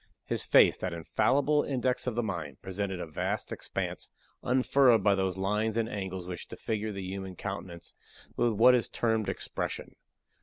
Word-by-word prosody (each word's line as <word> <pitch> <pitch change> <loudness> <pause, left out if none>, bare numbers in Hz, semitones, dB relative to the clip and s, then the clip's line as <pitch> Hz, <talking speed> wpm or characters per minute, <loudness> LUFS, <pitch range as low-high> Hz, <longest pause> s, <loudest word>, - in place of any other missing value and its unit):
His - - -1
face, - - +6
that 90 -2 -3
infallible 135 - +2
index 130 -2 -1
of 125 - -1
the 120 - 0
mind, 85 -10 -4
presented 95 -1 -3
a - - -3
vast 80 - -3
expanse, - - -4 0.3
unfurrowed 130 -1 +4
by 100 - +5
those 95 -1 -1
lines 105 +3 0
and 115 -1 +1
angles 95 -4 -5
which 90 0 -6
disfigure 110 -1 -3
the 95 -1 -5
human 95 0 -5
countenance 95 -3 -7 0.4
with 120 -1 +2
what 120 +4 +6
is 125 -2 +2
termed 110 -2 0
expression. - - -4
100 Hz, 160 wpm, -29 LUFS, 95-120 Hz, 0.4 s, face